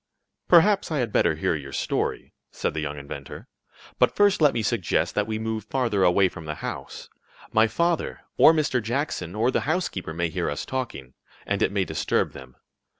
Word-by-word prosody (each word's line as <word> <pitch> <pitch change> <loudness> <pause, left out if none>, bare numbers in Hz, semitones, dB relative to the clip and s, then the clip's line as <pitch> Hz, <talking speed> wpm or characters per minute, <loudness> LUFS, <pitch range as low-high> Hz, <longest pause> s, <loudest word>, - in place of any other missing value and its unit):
"Perhaps 195 +4 +5
I 155 - 0
had 120 -5 -1
better 85 -5 +2
hear 80 - 0
your 70 -3 -6
story," - - -2 0.2
said - - -2
the 80 - -3
young 75 -1 -4
inventor. 70 -1 -8 0.5
"But - - +3
first 205 -3 +3
let 150 -2 +6
me 115 - -2
suggest - - 0
that 105 0 0
we 110 -1 -2
move 110 -1 -3
farther 115 -7 0
away 95 +2 +4
from 85 -3 -9
the 75 0 -4
house. - - -7 0.4
My 110 +1 +4
father, 170 +7 -1
or - - +8
Mr. 150 -6 +1
Jackson, 110 - -3
or 115 +4 +2
the - - +1
housekeeper, 130 - -2
may 85 0 0
hear - - -2
us 75 - -4
talking, 115 - -5 0.3
and 100 0 -1
it - - +2
may 100 -2 0
disturb 80 -2 0
them. 65 -2 -12
105 Hz, 190 wpm, -25 LUFS, 80-130 Hz, 0.5 s, or